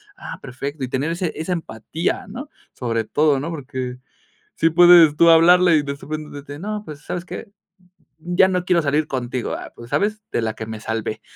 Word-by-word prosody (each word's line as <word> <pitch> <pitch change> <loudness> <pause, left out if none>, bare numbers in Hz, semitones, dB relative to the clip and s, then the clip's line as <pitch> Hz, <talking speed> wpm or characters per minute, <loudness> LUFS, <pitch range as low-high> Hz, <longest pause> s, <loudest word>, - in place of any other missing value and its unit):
Ah, - - -8
perfecto". 140 +3 -6
Y - - -7
tener 135 +5 -1
ese 170 -1 -2
esa 160 +4 -4
empatía, 160 0 -3
¿no? 260 +8 -8 0.2
Sobre 115 -2 -2
todo, 140 +5 +2
¿no? 165 - -4
Porque 130 -5 -5 0.6
sí 165 - +3
puedes 175 -2 +7
tú 170 +2 +5
hablarle 175 +1 +6
y 150 - +1
despues, 145 +2 -5
de 145 - -8
que: 145 +1 -9
"No, 210 +3 -4
pues, 150 -2 -9
¿sabes 180 - -4
qué? 185 - -8 0.7
Ya 175 +3 +3
no 180 -1 -1
quiero 180 -2 +2
salir 150 +1 0
contigo". 125 -2 -3
"Ah - - -8
pues, 120 0 -12
¿sabes? 215 +1 0
De - - -1
la 110 -1 -2
que 110 - -6
me 110 0 -6
salvé". 110 0 -4
155 Hz, 195 wpm, -21 LUFS, 130-175 Hz, 0.7 s, puedes